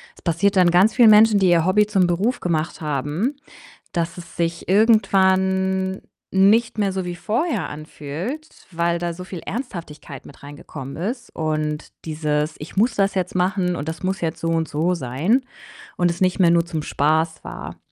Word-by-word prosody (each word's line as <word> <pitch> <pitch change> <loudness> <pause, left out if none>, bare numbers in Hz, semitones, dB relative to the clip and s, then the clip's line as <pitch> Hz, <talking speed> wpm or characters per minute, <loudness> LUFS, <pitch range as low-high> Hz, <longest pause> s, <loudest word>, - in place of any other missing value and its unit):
Das - - -19
passiert 190 +4 +1
dann 180 -2 +5
ganz 190 +5 +4
vielen 235 -4 +7
Menschen, 210 -1 +6
die 185 -2 +3
ihr 170 -1 +3
Hobby 210 +3 +4
zum 190 -4 +2
Beruf 205 +9 0
gemacht 165 -2 -2
haben, 150 - -2 0.6
dass 165 0 -2
es 170 - -12
sich 170 +1 -2
irgendwann 190 -3 +2 0.3
nicht 215 +4 +3
mehr 200 -2 +1
so 190 -1 -3
wie 175 0 -4
vorher 245 - -1
anfühlt, 155 - -6 0.2
weil 170 0 0
da 170 -1 -2
so 180 +2 -8
viel 185 -2 -7
Ernsthaftigkeit 165 - -7
mit 140 - -16
reingekommen 145 -2 -9
ist. 235 +8 -5
Und 155 -1 -2
dieses: 150 -1 -1
„Ich 150 - -9
muss 230 +4 +3
das 200 0 +1
jetzt 185 -1 -2
machen 180 -1 +1
und 150 +2 -4
das 165 - -7
muss 190 0 -2
jetzt 165 -1 -2
so 165 - -2
und 165 -1 0
so 160 +5 0
sein“, 170 - 0 0.6
und 175 -1 +2
es 170 - -8
nicht 185 +1 +2
mehr 170 -2 +5
nur 170 0 +3
zum 160 -3 -3
Spaß 160 +2 0
war. - - -8
175 Hz, 180 wpm, -21 LUFS, 160-195 Hz, 0.6 s, vielen